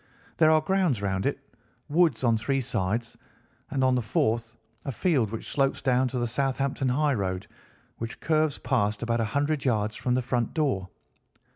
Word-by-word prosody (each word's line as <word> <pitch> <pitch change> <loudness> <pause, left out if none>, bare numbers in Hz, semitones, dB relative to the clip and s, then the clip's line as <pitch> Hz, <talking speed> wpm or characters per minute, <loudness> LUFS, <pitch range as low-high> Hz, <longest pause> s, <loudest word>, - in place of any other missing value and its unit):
There 155 -1 +5
are 155 0 +5
grounds 180 - +1
round 95 -1 -1
it, - - -1 0.5
woods 165 -1 +2
on 115 -2 +4
three 135 +5 0
sides, 115 -1 -2 0.5
and 135 - 0
on 130 0 +4
the 125 - +2
fourth 115 +1 0 0.3
a 140 - -3
field 130 - +1
which 115 +1 -6
slopes 135 -1 +1
down 130 0 +2
to 125 - -4
the 120 - 0
Southampton 135 +1 0
highroad, 120 -10 0 0.5
which 115 0 -5
curves 155 -2 +1
past 110 -5 0
about 120 0 0
a 115 - +1
hundred 145 +5 0
yards 110 -4 0
from 125 -1 0
the 130 - 0
front 120 +2 -1
door. 130 - 0
125 Hz, 170 wpm, -27 LUFS, 115-140 Hz, 0.5 s, There